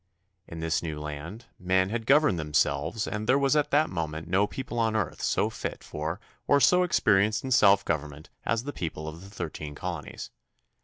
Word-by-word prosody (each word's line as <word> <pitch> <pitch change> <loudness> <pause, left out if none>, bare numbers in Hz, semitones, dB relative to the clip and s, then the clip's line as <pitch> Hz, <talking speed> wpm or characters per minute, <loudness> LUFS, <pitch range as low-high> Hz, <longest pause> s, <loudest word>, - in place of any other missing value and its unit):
In 85 0 -7
this 80 0 0
new 80 -3 -4
land 75 +9 -7
men 95 +1 +2
had 115 -1 -3
governed 135 - +4
themselves 75 +6 0
and 105 +1 -4
there 130 - +6
was 140 +1 +2
at 150 -1 +2
that 150 +2 +2
moment 80 -2 -4
no 95 +4 +2
people 120 -1 -5
on 110 -1 +1
earth 110 -4 -2
so - - +1
fit - - -5
for 80 +5 -4 0.3
or 145 - +5
so 180 +5 +5
experienced 110 - +3
in 130 - -4
self 100 -4 +5
government 75 -1 -4
as 115 +1 0
the 145 +2 -5
people 80 -2 -5
of 80 +2 -7
the 95 - -11
Thirteen 80 -6 -6
Colonies. 85 -4 -6
95 Hz, 190 wpm, -27 LUFS, 80-115 Hz, 0.3 s, there